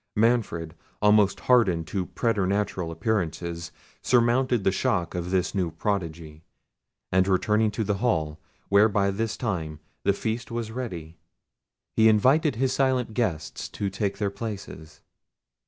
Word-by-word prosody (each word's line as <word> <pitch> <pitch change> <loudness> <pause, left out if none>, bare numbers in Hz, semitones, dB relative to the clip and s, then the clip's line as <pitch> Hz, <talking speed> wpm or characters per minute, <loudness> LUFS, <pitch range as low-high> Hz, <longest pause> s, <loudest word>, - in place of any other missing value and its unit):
Manfred, 105 -8 +1 0.3
almost 105 -2 +4
hardened 95 -10 +3
to 95 -3 -2
preternatural 100 -5 -1
appearances, 85 -3 -2 0.3
surmounted 120 -1 +2
the 95 - +3
shock 100 -5 0
of 90 0 -3
this 90 -1 0
new 95 -4 0
prodigy; 80 -5 -4 0.7
and 95 0 +3
returning 105 +3 +2
to 105 +2 -2
the 105 -1 -1
hall, 80 -10 0 0.3
where 100 +2 +5
by 100 -1 +1
this 110 +2 -2
time 80 -10 -3 0.2
the 100 - +2
feast 115 +5 -3
was 115 -2 -4
ready, 85 -10 -6 0.8
he 110 0 +6
invited 135 +8 +3
his 130 +2 0
silent 130 -4 +1
guests 90 -10 -2
to 100 -2 -3
take 100 -2 -2
their 100 -2 -1
places. 100 -8 -8
100 Hz, 135 wpm, -26 LUFS, 90-115 Hz, 0.8 s, he